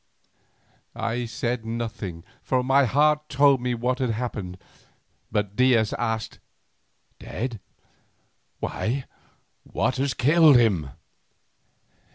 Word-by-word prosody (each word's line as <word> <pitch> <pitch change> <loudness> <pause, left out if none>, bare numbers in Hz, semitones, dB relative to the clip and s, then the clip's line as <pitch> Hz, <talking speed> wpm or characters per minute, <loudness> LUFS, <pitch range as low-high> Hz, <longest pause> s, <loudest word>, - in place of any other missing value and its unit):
I 120 +1 -2
said 120 +1 -3
nothing, 115 -7 -5 0.2
for 130 -1 0
my 135 +2 +4
heart 150 +4 +2
told 140 -1 +4
me 125 0 -1
what 125 +3 -1
had 130 -2 0
happened, 105 -6 -4 0.7
but 105 -2 -1
Diaz 120 -4 +3
asked, 115 -2 -3 0.8
"Dead—why, 120 +2 -7 0.6
what 130 - -1
has 135 0 -1
killed 155 +3 +5
him?" 95 - +2
120 Hz, 95 wpm, -25 LUFS, 110-130 Hz, 0.8 s, killed